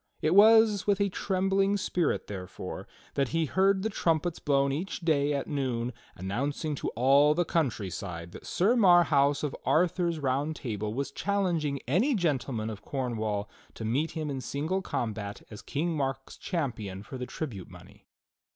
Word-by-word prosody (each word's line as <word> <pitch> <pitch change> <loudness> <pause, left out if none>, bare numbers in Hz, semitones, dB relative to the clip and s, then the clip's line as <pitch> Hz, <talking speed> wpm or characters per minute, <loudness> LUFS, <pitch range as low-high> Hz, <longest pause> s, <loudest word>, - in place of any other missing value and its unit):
It 155 - +1
was 215 0 +6
with 205 -1 +3
a 200 0 +2
trembling 195 +1 +1
spirit, 180 -3 0
therefore, 95 -3 -7 0.3
that 140 -1 +1
he 165 +4 0
heard 190 +4 +2
the 220 - 0
trumpets 165 -2 0
blown 140 -1 +2
each 175 +7 -3
day 150 -3 +2
at 140 -1 -1
noon 125 -4 -2 0.2
announcing 140 - -2
to 140 - -4
all 140 +5 +5
the 175 +1 +1
countryside 95 - -2
that - - -11
Sir 205 +7 +2
Marhaus 165 - +4
of 150 - -2
Arthur's 170 0 +2
Round 140 +2 -1
Table 105 -6 -4
was 135 +5 -3
challenging 175 -8 0
any 215 - +2
gentleman 130 - -1
of 105 - -8
Cornwall 110 -6 -2 0.3
to 110 - -6
meet 140 +9 0
him 155 -3 -3
in 135 -1 -4
single 155 +9 -2
combat 105 - -4
as 105 - -8
King 165 +3 -2
Mark's 135 -2 -3
champion 110 - -4
for 130 +4 -8
the 125 - -4
tribute 125 - -6
money. - - -15
145 Hz, 160 wpm, -29 LUFS, 125-175 Hz, 0.3 s, was